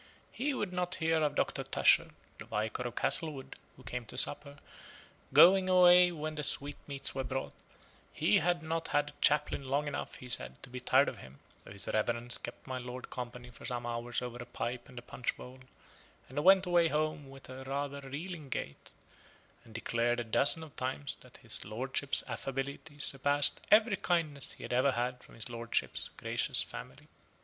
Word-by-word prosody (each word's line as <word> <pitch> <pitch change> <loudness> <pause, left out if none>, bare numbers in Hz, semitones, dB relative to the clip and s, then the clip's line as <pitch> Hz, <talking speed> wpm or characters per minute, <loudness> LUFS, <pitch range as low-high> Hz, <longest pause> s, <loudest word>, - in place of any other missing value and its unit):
He 280 +2 -1
would 200 -6 -3
not 180 0 0
hear 160 -2 +1
of 150 -1 +1
Doctor - - 0
Tusher - - +4 0.3
(the - - -8
Vicar 110 +4 -2
of 120 - -8
Castlewood, 150 -5 -1 0.2
who 130 - -15
came 125 0 -4
to 125 - -10
supper) 145 +1 -1 0.7
going 185 +1 +7
away 180 -1 +7
when 155 -2 -4
the 155 - -4
sweetmeats 140 -1 -2
were 135 - -2
brought: 130 +1 -4 0.6
he 105 - +3
had 175 0 0
not 165 +1 -2
had 145 0 +1
a - - -29
chaplain 150 -1 +2
long 145 +2 +1
enough, 145 - -4
he 125 - -10
said, 125 0 +1
to - - -10
be 125 - -5
tired 125 - +4
of - - -4
him: 65 +1 -13 0.3
so - - -13
his 100 -1 -4
reverence 120 +3 -1
kept - - -9
my 130 -1 -4
lord 125 +1 -8
company 125 0 -7
for - - -15
some 120 -2 -4
hours 120 +1 -2
over 120 0 -6
a - - -7
pipe 120 +2 -4
and 125 - -14
a 120 - -7
punch 120 0 -3
bowl; 130 +1 -11 0.7
and 145 +3 -3
went 190 +1 +7
away 175 -2 +4
home 155 -2 -1
with 135 0 -11 0.2
rather 140 +1 -2
a 135 -1 -10
reeling 155 +1 -6
gait, 70 - -6 0.7
and 115 -3 -16
declaring 120 +1 0
a - - -1
dozen 140 +8 +4
of 155 - -12
times, 130 +2 -2
that - - -16
his - - -6
lordship's 130 +6 0
affability 140 +3 -5
surpassed 145 0 +2
every 215 -1 +5
kindness 155 -6 +2
he - - -12
had - - -4
ever 130 +2 +3
had 125 +1 -2
from - - -16
his 115 - -3
lordship's 115 -1 -2
gracious - - +1
family. - - -10
135 Hz, 185 wpm, -32 LUFS, 125-155 Hz, 0.7 s, going